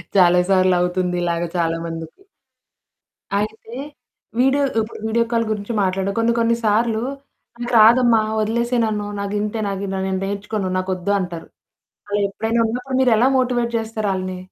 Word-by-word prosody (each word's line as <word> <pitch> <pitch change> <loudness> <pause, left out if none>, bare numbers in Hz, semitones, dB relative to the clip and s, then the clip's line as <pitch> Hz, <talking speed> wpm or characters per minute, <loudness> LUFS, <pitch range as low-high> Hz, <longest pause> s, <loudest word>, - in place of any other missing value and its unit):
చాలా 180 -1 +6
సార్లవుతుంది 180 -1 +2
ఇలాగా 170 0 -1
చాలా 165 -1 0
మందికి. 165 - -7 1.1
అయితే, 220 +2 -4 0.7
వీడియో 270 +2 +3 0.2
ఇప్పుడు 220 0 -4
వీడియో 230 +1 +2
కాల్ 230 -1 +2
గురించి 210 +2 -3
మాట్లాడు 190 +1 0
కొన్ని 230 +1 +2
కొన్నిసార్లు 230 -1 +1 0.6
నాకు 240 0 -4
రాదమ్మా! 230 +1 +6 0.2
వదిలేసేయ్ 235 +2 0
నన్ను. 210 -1 -2
నాగింతే. 210 +2 -2
నాకు 195 0 -3
ఇట్లా 190 0 -3
నేను 190 -1 -1
నేర్చుకోను. 200 0 -3
నాకొద్దు 185 +1 -2
అంటారు. 175 -3 -5 0.6
అలా 205 0 0
ఎప్పుడైనా 225 +3 -1
అన్నప్పుడు 250 +3 -3
మీరెలా 245 -1 +4
మోటివేట్ 240 -2 0
జేస్తారాళ్ళని? 200 -5 -2
210 Hz, 130 wpm, -20 LUFS, 185-230 Hz, 1.1 s, చాలా